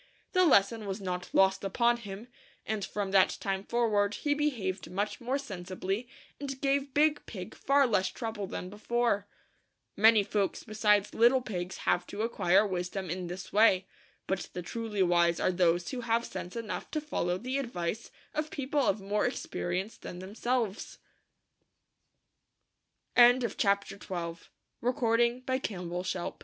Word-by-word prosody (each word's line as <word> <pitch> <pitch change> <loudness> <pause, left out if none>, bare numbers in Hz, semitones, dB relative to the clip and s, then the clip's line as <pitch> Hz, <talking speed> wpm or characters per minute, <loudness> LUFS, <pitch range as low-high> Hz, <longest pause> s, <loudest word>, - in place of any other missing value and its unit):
The 365 -2 +4
lesson 215 - +3
was 195 +1 -3
not 180 -2 -4
lost 190 0 +3
upon 235 +5 +2
him, 210 0 -8 0.4
and 215 -2 -2
from 200 -1 -3
that 195 -1 +4
time 195 -1 -2
forward 210 -3 +1
he 290 - 0
be 295 +1 +2
haved 190 -8 -4
much 205 +6 -2
more 255 +3 0
sensibly, 195 -1 -4 0.3
and 275 -2 -5
gave 275 0 0
Big 300 0 +3
Pig 185 -5 -7
far 280 0 +3
less 190 -6 +2
trouble 220 0 -4
than 180 - -5
before. 210 0 0 0.7
Many 220 0 +6
folks 200 0 -1
besides 210 -2 +2
little 245 +3 +4
pigs 180 -4 -4
have 175 0 +2
to 205 +2 -4
acquire 200 -3 +3
wisdom 185 -1 -3
in 180 0 -3
this 180 +2 -7
way; 200 -3 +5 0.4
but 190 0 -2
the 180 - -5
truly 215 0 -1
wise 170 -1 +3
are - - +2
those 175 -1 +2
who 255 -2 -4
have 230 0 +1
sense 180 - -7
enough 230 -2 -4
to 310 - -1
follow 180 - -1
the 255 +7 -2
advice 220 -4 -3 0.2
of 305 0 -2
people 280 +1 -1
of 205 -5 +1
more 205 +3 +1
experienc 190 -4 -3
205 Hz, 130 wpm, -30 LUFS, 185-240 Hz, 0.7 s, Many